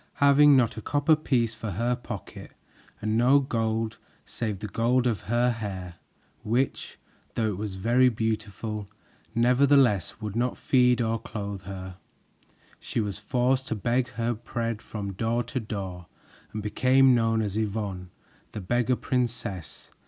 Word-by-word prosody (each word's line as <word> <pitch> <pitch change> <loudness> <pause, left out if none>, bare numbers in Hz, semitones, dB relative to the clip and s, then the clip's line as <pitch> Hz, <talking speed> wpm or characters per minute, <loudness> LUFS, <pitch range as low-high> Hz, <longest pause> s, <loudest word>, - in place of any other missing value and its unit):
Having 140 0 +6
not 115 -3 +2
a - - -4
copper 145 +6 +3
piece 125 -7 0
for 110 0 -6
her 120 +6 0
pocket 120 -5 -8 0.5
and 110 +1 0
no 125 +5 +5
gold 115 -4 -1 0.3
save 110 -4 -3
the 105 - -6
gold 120 +5 +1
of 115 -5 0
her 120 +1 +3
hair, 95 -6 -6 0.4
which, 125 +5 -1 0.4
though 110 -1 +1
it 100 - -3
was 105 -2 -4
very 120 +6 +4
beautiful, 110 -2 -3 0.5
nevertheless 125 - +3
would 105 -2 -5
not 120 +1 0
feed 125 -2 +3
or 115 0 0
clothe 100 -3 -6
her, 95 -1 -7 0.8
she - - -3
was 105 -2 -2
forced 130 +4 0
to - - -2
beg 120 +4 0
her 115 +1 -1
bread 115 0 -4
from 100 -2 -5
door 115 +5 0
to 130 - -3
door 95 -6 -6 0.4
and 105 -1 -5
became 130 +4 +4
known 115 -2 +2
as 100 -2 -3
Yvonne, 100 -4 -3 0.4
the - - -4
Beggar 120 +6 +1
Princess. 115 - -3
115 Hz, 145 wpm, -27 LUFS, 105-125 Hz, 0.8 s, Having